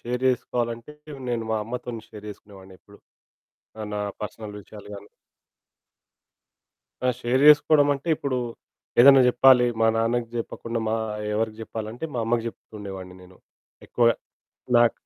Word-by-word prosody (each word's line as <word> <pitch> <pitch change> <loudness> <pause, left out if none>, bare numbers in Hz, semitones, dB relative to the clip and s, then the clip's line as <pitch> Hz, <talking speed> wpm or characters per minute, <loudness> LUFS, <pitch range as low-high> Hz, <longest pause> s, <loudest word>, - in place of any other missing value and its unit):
Share 125 +2 -4
చేసుకోవాలంటే 120 +2 -2 0.4
నేను 115 -1 -1
మా 110 - +1
అమ్మతోని 120 -1 -6
షేర్ 105 -1 -11
చేసుకునేవానెప్పుడు. 100 0 -15 0.8
ఆహ్, 105 -1 -5
నా 105 - -2 0.2
పర్సనల్ 105 +1 -7
విషయాలు 105 +1 -13
గాని 100 +1 -13 1.9
ఆ! 125 - 0
షేర్ 125 +3 +1
చేసుకోవడమంటే, 145 0 +5
ఇప్పుడూ 140 -3 -2 0.6
ఏదైనా 135 +1 +9
జెప్పాలి, 125 0 +6 0.2
మా 115 - +5
నాన్నకి 115 +1 0
జెప్పకుండా 115 0 -4
మా 110 - +1 0.4
ఎవరికి 110 0 -2
జెప్పాలంటే, 110 +5 -6
మా - - -1
అమ్మకి 115 0 0
జెప్తుండేవాన్ని 95 -5 -9
నేను. 90 0 -17 0.5
ఎక్కువగా 115 -1 +3 0.6
నాకు 120 -1 +5
115 Hz, 120 wpm, -24 LUFS, 105-125 Hz, 1.9 s, ఏదైనా